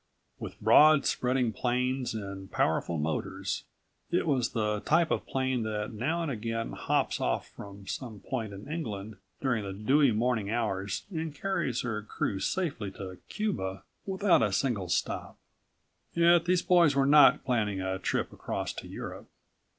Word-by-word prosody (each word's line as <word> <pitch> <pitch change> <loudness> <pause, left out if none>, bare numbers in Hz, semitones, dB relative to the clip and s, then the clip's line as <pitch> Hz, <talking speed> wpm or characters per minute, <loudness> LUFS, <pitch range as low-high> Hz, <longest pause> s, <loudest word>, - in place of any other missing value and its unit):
With - - -7
broad 155 -2 +6
spreading 125 -2 +1
planes 125 0 -1
and 100 -2 -6
powerful 85 - +1
motors, 75 +1 -2 0.4
it 175 - +1
was 130 -6 +1
the 105 -2 0
type 160 +8 +2
of - - -1
plane 130 -2 0
that 110 0 -3
now 155 +10 -1
and 155 - -2
again 115 -1 -3
hops - - 0
off - - -1
from 100 -1 -11
some 110 -1 -5
point 115 0 -4
in 100 +3 -9
England 110 - -5 0.2
during 125 -6 0
the 100 -1 -5
dewy 130 +7 +3
morning 110 -2 0
hours 100 -4 -2
and 160 -3 -4
carries 145 - -1
her 110 -3 -2
crew 105 -1 -2
safely 140 - -2
to 95 -1 -8
Cuba 95 - -2 0.2
without 190 - +3
a 105 -3 +2
single 95 -2 0
stop. 85 - -2 0.8
Yet 170 0 +5
these 180 0 +2
boys 170 -5 +5
were 135 -1 +3
not 145 0 +7
planning 105 -7 0
a 95 0 -2
trip - - -1
across - - -4
to - - -8
Europe. - - -7
120 Hz, 155 wpm, -29 LUFS, 100-145 Hz, 0.8 s, not